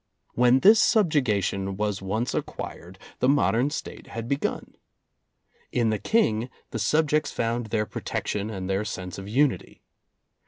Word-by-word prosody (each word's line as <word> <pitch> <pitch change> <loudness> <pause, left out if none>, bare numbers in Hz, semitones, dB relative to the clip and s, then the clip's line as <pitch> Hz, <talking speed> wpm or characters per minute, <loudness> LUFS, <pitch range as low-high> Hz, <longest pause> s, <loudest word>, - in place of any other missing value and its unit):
When 125 +2 +4
this 215 +3 +7
subjugation 105 - +2
was 105 -2 -1
once 110 +6 -2
acquired, 90 +3 -6 0.2
the 125 - +3
modern 135 -2 +3
State 150 - -7
had 115 0 -6
begun. 140 +2 -2 1.0
In 115 -3 +1
the 110 - -1
King, 120 - +1 0.2
the - - -3
sub 155 0 +2
jects 150 +1 +1
found 115 0 -2
their 105 0 0
protection 105 0 -3
and 95 -4 -5
their 95 +2 0
sense 90 -3 -6
of 95 - -8
unity. 135 +4 0
115 Hz, 145 wpm, -26 LUFS, 100-140 Hz, 1.0 s, this